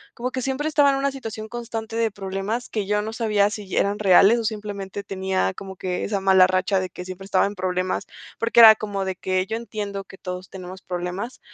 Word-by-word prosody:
Como 250 +2 -3
que 260 - -3
siempre 270 +4 -1
estaba 295 -2 +4
en 275 - +2
una 275 +1 0
situación 225 -5 -7
constante 225 -1 -5
de 230 -1 +2
problemas, 200 +4 -4
que 210 -3 -3
yo 210 0 +1
no 220 +1 -5
sabía 210 -3 +2
si 205 -3 -6
eran 200 +1 +1
reales 200 +3 +6
o - - -3
simplemente 205 -3 -4
tenía 190 - -1
como 190 -1 -9
que 180 -1 -3
esa 200 -1 -1
mala 190 -1 +6
racha 185 +1 +1
de 185 0 -3
que 180 +1 -9
siempre 185 +1 -8
estaba 195 - +2
en 200 - -3
problemas. 185 0 -2 0.3
Porque 230 +1 +3
era 220 -1 +11
como 205 -2 -3
de 190 -1 -2
que, 185 +1 -1
yo 220 - -3
entiendo 205 -4 -5
que 195 - -14
todos 180 0 -7
tenemos 185 0 -9
problemas, 180 +6 -5
200 Hz, 220 wpm, -23 LUFS, 190-225 Hz, 0.3 s, era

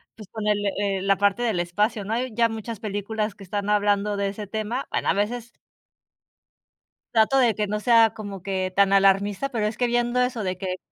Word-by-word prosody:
pues 215 -3 -12
con 220 -1 -5
el 200 -2 0
la 195 -1 +4
parte 205 +4 +1
del 215 -7 0
espacio, 205 +5 0
¿no?, 215 +3 -3
hay 245 0 -2
ya 230 0 +2
muchas 225 -1 -6
películas 210 0 -3
que 200 - -13
están 200 +1 -3
hablando 205 0 +1
de 200 0 0
ese 205 +1 -7
tema, 220 +5 -3
bueno, - - -1
a - - +4
veces 230 +4 -2 1.6
trato 225 +4 +4
de 240 -4 +4
que 210 +1 -2
no 210 +1 -2
sea 230 -1 +5
como 200 -3 -7
que 185 0 -2
tan 200 0 +4
alarmista, 195 +5 +3
pero 220 -5 -1
es 215 - -5
que 250 - +1
viendo 240 +1 +1
eso 250 -2 0
de 185 -2 -2
que 185 -1 -4
210 Hz, 205 wpm, -24 LUFS, 200-225 Hz, 1.6 s, sea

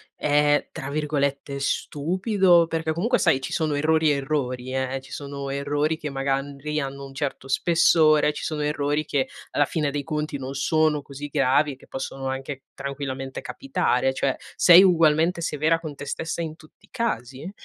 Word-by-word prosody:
è, 145 0 +2
tra 135 +1 -6
virgolette, 140 -2 -1
"stupido"? 175 - +2
Perché 160 -1 -1
comunque, 230 +9 +1
sai, 145 -7 +3
ci - - -5
sono 155 -5 0
errori 155 +1 +2
e - - +2
errori, 130 -3 -2
eh, 130 0 -1
ci 130 - -16
sono 140 -1 -6
errori 145 +3 -1
che 150 - -5
magari 140 +2 -2
hanno 140 0 -5
un 135 - -11
certo 135 -1 -4
spessore, 155 0 +4
ci - - -7
sono 155 -1 -2
errori 150 0 0
che 135 -2 0 0.2
alla 145 - +2
fine 150 0 -1
dei 145 0 -3
conti 150 -2 -3
non 135 0 -6
sono 155 +1 +1
così 140 +1 -8
gravi 140 +2 +2
e - - -11
che 130 - -20
possono 135 0 -5
anche 135 +1 -5
tranquillamente 135 -1 -5
capitare, 135 - 0
cioè 135 0 0 0.2
sei 180 +2 +8
ugualmente 165 -1 +3
severa 160 +1 +1
con 155 -3 -7
te 145 - -8
stessa 160 +4 -3
in 160 -1 -4
tutti 155 +5 -20
i - - -34
casi? 140 - -3
145 Hz, 175 wpm, -24 LUFS, 135-160 Hz, 0.2 s, sei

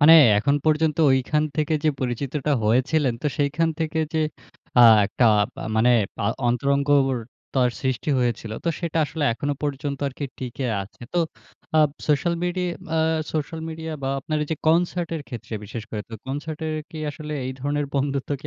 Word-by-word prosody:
মানে 155 +3 +9 0.2
এখন 140 +7 +2
পর্যন্ত 155 -1 +2 0.2
ঐখান 130 +4 +2
থেকে 155 +1 +1
যে, - - +5
পরিচিতটা 135 +3 -1
হয়েছিলেন, 130 +4 +2
তো - - 0
সেইখান 150 +3 +2
থেকে 160 0 -1 0.2
যে, 160 - +2 0.6
আ - - +9 0.2
একটা 120 - +1 0.3
পা - - -7
মানে 120 +3 +5 0.3
পা 105 - -3 0.2
অন্তরঙ্গর 140 +2 +2 0.4
তার 125 -2 +3
সৃষ্টি 130 +1 -1
হয়েছিল। 120 -3 -1
তো 170 - +1
সেটা 165 -1 -1
আসলে 155 -1 -3
এখনো 145 +5 -2
পর্যন্ত 140 -1 -2
আরকি 140 +2 -6
টিকে 130 +1 -4 0.2
আছে। 95 - -15
তো 175 - +1 0.6
আপ 150 -2 +4 0.2
সোশ্যাল 160 +4 +2
মিডি 180 +1 -1 0.4
আ - - +3 0.3
সোশ্যাল 160 +1 -3
মিডিয়া 160 0 -5
বা 135 - -1
আপনার 155 +3 -2
এইযে 155 +1 -3
কনসার্টের 165 -1 +1
ক্ষেত্রে, 115 -2 -8
বিশেষ 110 +3 -6
করে 105 -2 -3
তো 115 - -8
কনসার্টের 155 +3 -4 0.2
কি 160 - -8
আসলে 150 +1 -7
এই 130 - -3
ধরনের 145 +2 -1
বন্ধুত্ব 140 0 -1
কি - - -8
145 Hz, 165 wpm, -24 LUFS, 130-155 Hz, 0.6 s, মানে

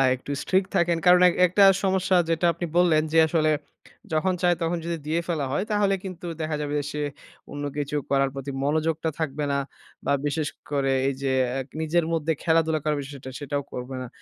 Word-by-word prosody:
একটু 130 +3 -8
strict 190 0 +1
থাকেন। 170 -2 +2
কারণ 180 0 +7
এক - - -1
একটা 190 +3 +4 0.2
সমস্যা 190 -1 +2
যেটা 165 +1 +1
আপনি 175 +2 -4
বললেন 170 -3 +4
যে, 165 - +4
আসলে 155 -1 +2 0.6
যখন 185 +4 +2
চায় 175 -1 +3
তখন 170 +1 0
যদি 170 0 -2
দিয়ে 160 +2 +1
ফেলা 155 -5 -1
হয়, 150 - 0
তাহলে 205 -1 +2
কিন্তু 185 -2 -7 0.2
দেখা 155 -1 -1
যাবে 145 0 -3
যে, 145 - -3
সে 150 - -3 0.5
অন্য 145 0 -5
কিছু 145 0 -2
করার 135 -1 +2
প্রতি 135 0 -5
মনোযোগটা 160 +2 0
থাকবে 150 -2 -2
না। 140 - +1 0.5
বা 140 - +2
বিশেষ 145 +1 -1 0.2
করে 135 -2 +1
এই 135 - +1
যে, 135 -1 0 0.3
এক 130 - -10
নিজের 160 +1 +1
মধ্যে 160 0 0
খেলাধুলা 160 -1 +2
করার 150 -1 0
বিষয়টা 135 -1 -9
সেটাও 145 0 -3
করবে 125 +1 -5
না। 125 - -5
155 Hz, 195 wpm, -25 LUFS, 145-170 Hz, 0.6 s, কারণ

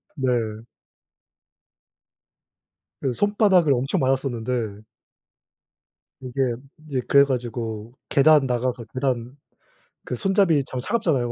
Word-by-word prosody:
네. 135 -4 -2 2.7
그 135 - -1
손바닥을 200 - +3
엄청 135 +8 0
맞았었는데 125 -5 -1 1.4
이게 130 -1 -1 0.3
이제 135 -3 -1
그래 140 0 +7
가지고 120 -4 -4 0.2
계단 145 0 +5
나가서 125 -1 -1
계단 130 -1 -2 0.7
그 - - -4
손잡이 190 - +2
참 130 - -5
차갑잖아요. 140 - 0
130 Hz, 205 characters per minute, -23 LUFS, 120-145 Hz, 2.7 s, 그래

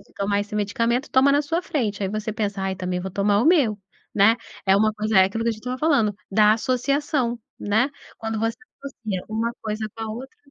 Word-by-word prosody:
tomar 200 0 0
esse 210 +1 -4
medicamento 230 +6 0
toma 265 +2 +5
na 290 +1 +3
sua 330 +4 -1
frente 215 - -2
aí 190 - -1
você 215 +1 -3
pensa 205 -2 -2
ai 190 0 -1
também 180 -1 -3
vou 190 +1 -5
tomar 200 +2 +2
o - - +1
meu, 275 - +4 0.4
né, 215 +3 +6 0.3
é 190 0 +5
um 200 - +3
coisa, 215 -1 0
é 190 - +8
aquilo 225 +4 -3
que 235 - +2
a - - +2
gente 215 - -7
estava 250 +1 -4
falando 270 -10 +2 0.2
da 210 +1 +5
associação, 255 +1 0 0.2
né, 220 +7 +2 0.3
quando 225 -1 -3
você 225 0 -1 0.2
associa 220 -9 -5
um 220 +1 -2 0.2
coisa 215 0 -3
com 225 - -8
a - - -4
outra. 265 - -9
220 Hz, 215 wpm, -23 LUFS, 205-250 Hz, 0.4 s, é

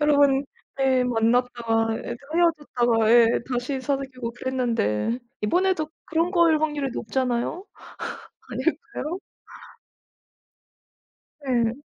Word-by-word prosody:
여러 295 -1 +4
번 280 -1 +4 0.3
네 265 -2 +3
만났다가 230 -1 +1
예 - - -5
또 285 +6 -5
헤어졌다가 245 -10 +2
예 235 -1 +7 0.2
다시 250 +2 -2
사귀고 265 -3 -3
그랬는데. 235 - -1 0.2
이번에도 355 - +1 0.2
그런 330 +2 +1
거일 340 -4 +4
확률이 295 -3 0
높잖아요? 250 - -2 0.9
아닐까요? 340 +4 -2 2.3
예. 235 -3 +2
260 Hz, 225 characters per minute, -24 LUFS, 235-295 Hz, 2.3 s, 예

